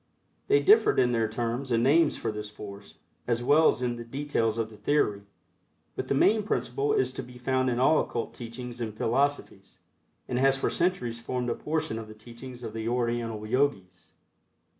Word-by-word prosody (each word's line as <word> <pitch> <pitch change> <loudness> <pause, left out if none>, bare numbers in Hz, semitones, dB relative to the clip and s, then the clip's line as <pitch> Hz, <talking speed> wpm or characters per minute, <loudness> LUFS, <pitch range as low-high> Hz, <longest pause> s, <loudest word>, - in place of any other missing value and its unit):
They 420 +1 +4
differed 425 +3 +5
in 125 -1 +4
their 115 -2 +1
terms 120 +4 -3
and 115 0 +2
names 150 +4 +4
for 115 - -2
this 105 0 -6
force, 100 -1 -11 0.3
as 120 0 0
well 155 +5 +5
as 125 - +1
in 120 -1 -1
the 120 - -6
details 115 -3 -1
of 110 -1 -2
the - - -12
theory, 105 -2 +1 0.7
but - - -4
the - - +1
main 215 +10 +4
principle 415 - -1
is 415 -2 +1
to - - -5
be 125 0 -12
found 130 +1 0
in 120 - -1
all 155 +5 +4
occult 115 - -4
teachings 120 +1 -8
and 110 -2 -4
philosophies, 125 -6 -1 0.5
and 125 - -1
has 135 0 +4
for - - -1
centuries 125 -10 -1
formed 125 0 -2
a - - +1
portion 155 -5 -2
of 110 - -8
the 110 - -11
teachings 120 +3 -11
of 110 -2 -6
the 110 0 -4
Oriental 120 -3 -1
Yogis. 110 -7 -1
120 Hz, 190 wpm, -28 LUFS, 115-135 Hz, 0.7 s, differed